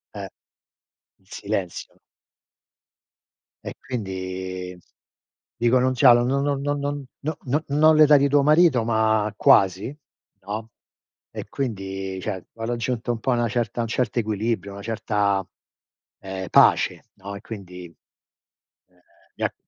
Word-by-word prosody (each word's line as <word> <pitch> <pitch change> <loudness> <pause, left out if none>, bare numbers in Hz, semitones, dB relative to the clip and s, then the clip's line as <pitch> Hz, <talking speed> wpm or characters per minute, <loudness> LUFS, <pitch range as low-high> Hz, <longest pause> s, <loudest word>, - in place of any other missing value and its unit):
Eh. - - -5 0.9
In 95 - -33
silenzio. 100 -2 -5 1.7
E - - -7
quindi, 95 -5 -5 0.8
dico: 120 +2 +3
"Non 130 +1 +2
c'hanno, 120 -2 +6
non 135 +2 +1
non 140 -1 0
non 145 0 -1
non 145 -1 -3 0.2
no 155 +1 -3
no 145 +5 0
no 155 +3 +4
l'età 150 -1 +7
di 140 +1 +3
tuo 140 0 +3
marito 150 -5 +4
ma 110 -2 +1
quasi", 95 +8 +3 0.5
no, 105 +3 -6 0.6
e - - -7
quindi, 95 -6 -4
cioè, 95 -3 -5
ho 115 0 -6
raggiunto 120 0 -2
un 115 - -6
po' 130 - 0
una 120 -1 +1
certa 120 0 -2
un 115 - -2
certo 120 +1 -1
equilibrio, 110 -1 -2
una 100 - -9
certa, 100 -3 -1 0.7
ehm, 95 -1 -6
pace, - - +4
no, 100 +1 -8
e - - -7
quindi, 90 -6 -9
ehm, 85 - -22 1.1
mi - - -3
ha - - -1
115 Hz, 135 wpm, -23 LUFS, 95-130 Hz, 1.7 s, l'età